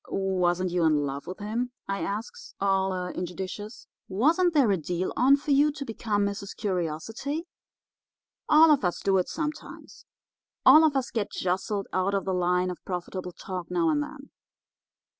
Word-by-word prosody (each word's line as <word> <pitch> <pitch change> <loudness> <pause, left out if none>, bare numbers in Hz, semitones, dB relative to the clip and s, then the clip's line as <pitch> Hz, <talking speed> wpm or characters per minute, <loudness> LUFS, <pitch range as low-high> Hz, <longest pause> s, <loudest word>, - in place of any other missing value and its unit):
"'Wasn't 185 -2 0
you 175 -1 +1
in 150 -2 +3
love 140 0 -5
with 185 - -6
him?' 230 +4 -3
I 195 0 -2
asks, 210 +3 -5
all 195 -1 +1 0.2
injudicious. 190 +5 -6 0.2
'Wasn't 320 - +2
there 265 -8 +5
a - - +3
deal 175 +3 -3
on 265 +3 +5
for 290 +1 -4
you 290 +2 +5
to 280 - -6
become 215 -3 -1
Mrs. 200 0 -5
Curiosity?' 205 - -3 1.0
"All 310 +1 +7
of 285 -6 +3
us 180 -1 0
do 195 -1 +3
it 180 - -2
sometimes. 310 -1 -6 0.6
All 310 - +9
of 305 -3 +3
us 265 -1 -1
get 215 -3 -2
jostled 190 +2 -2
out 185 +2 +1
of 195 - -1
the 190 - -1
line 180 0 +1
of 180 - -10
profitable 180 0 -5
talk 180 -2 -6
now 340 -2 +1
and 295 -1 +1
then. 290 -1 -8
200 Hz, 165 wpm, -27 LUFS, 180-275 Hz, 1.0 s, All